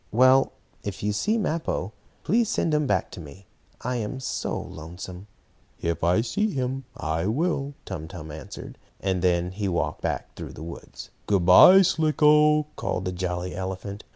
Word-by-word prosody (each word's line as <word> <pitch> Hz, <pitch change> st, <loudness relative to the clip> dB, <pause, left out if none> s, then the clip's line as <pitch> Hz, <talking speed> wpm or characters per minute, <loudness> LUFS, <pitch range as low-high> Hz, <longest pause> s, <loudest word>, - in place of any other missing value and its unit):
Well, 130 Hz, +3 st, +5 dB, 0.3 s
if 100 Hz, -2 st, -6 dB
you 105 Hz, 0 st, +1 dB
see 210 Hz, -, +1 dB
Mappo, 160 Hz, -, -2 dB, 0.3 s
please 225 Hz, +4 st, +2 dB
send 160 Hz, -, 0 dB
him 150 Hz, -1 st, +2 dB
back -, -, 0 dB
to -, -, -9 dB
me. 85 Hz, +5 st, -11 dB, 0.4 s
I 125 Hz, 0 st, -2 dB
am 115 Hz, +3 st, -4 dB
so 130 Hz, -, -3 dB
lonesome." 90 Hz, +4 st, -9 dB, 0.5 s
"If 85 Hz, -1 st, -2 dB
I 90 Hz, +5 st, +4 dB
see 205 Hz, -, 0 dB
him 130 Hz, -4 st, -3 dB
I 80 Hz, +3 st, -1 dB
will," 140 Hz, +2 st, -1 dB
Tum 80 Hz, -5 st, -6 dB
Tum 80 Hz, -4 st, -8 dB
answered. 75 Hz, -2 st, -9 dB, 0.2 s
And 95 Hz, -2 st, -1 dB
then 90 Hz, -1 st, +1 dB
he 100 Hz, +1 st, -3 dB
walked 85 Hz, -3 st, -2 dB
on -, -, +1 dB
back -, -, -5 dB
through -, -, -7 dB
the 80 Hz, -, -9 dB
woods. 85 Hz, +1 st, -9 dB, 0.2 s
"Good 100 Hz, -4 st, +2 dB
bye, 185 Hz, -, +9 dB
Slicko!" 150 Hz, -2 st, +4 dB
called 95 Hz, -, -2 dB
the 90 Hz, -, -1 dB
jolly 90 Hz, 0 st, -3 dB
elephant. 95 Hz, +2 st, -5 dB
100 Hz, 170 wpm, -25 LUFS, 90-145 Hz, 0.5 s, bye